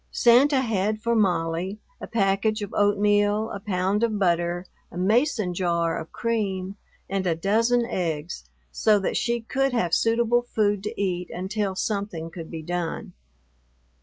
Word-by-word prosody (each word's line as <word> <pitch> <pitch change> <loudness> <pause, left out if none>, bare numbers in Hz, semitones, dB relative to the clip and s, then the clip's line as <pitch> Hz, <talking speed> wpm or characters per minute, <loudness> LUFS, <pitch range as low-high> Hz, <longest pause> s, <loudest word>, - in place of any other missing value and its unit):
Santa 260 +3 +4
had 215 -3 0
for 235 +2 0
Molly 180 -1 0 0.2
a - - -6
package 210 0 +1
of 205 - -7
oatmeal, 205 +1 +2
a - - -5
pound 195 0 0
of 225 -2 +1
butter, 175 -1 0 0.3
a - - -9
Mason 215 0 +1
jar 170 -2 0
of 160 - -9
cream, 200 -5 -2 0.3
and 195 -1 -2
a 165 - +2
dozen 230 +7 +2
eggs, 165 -6 -3 0.3
so 215 - +3
that 195 - -2
she 235 0 0
could 270 +3 0
have 175 -9 0
suitable 235 +1 +3
food 205 -4 0
to 210 +3 -6
eat 180 -3 -1
until 190 +1 -3
something 195 -6 -3
could 165 -2 -8
be 160 -2 -6
done. 175 +3 -4
200 Hz, 150 wpm, -25 LUFS, 180-225 Hz, 0.3 s, Santa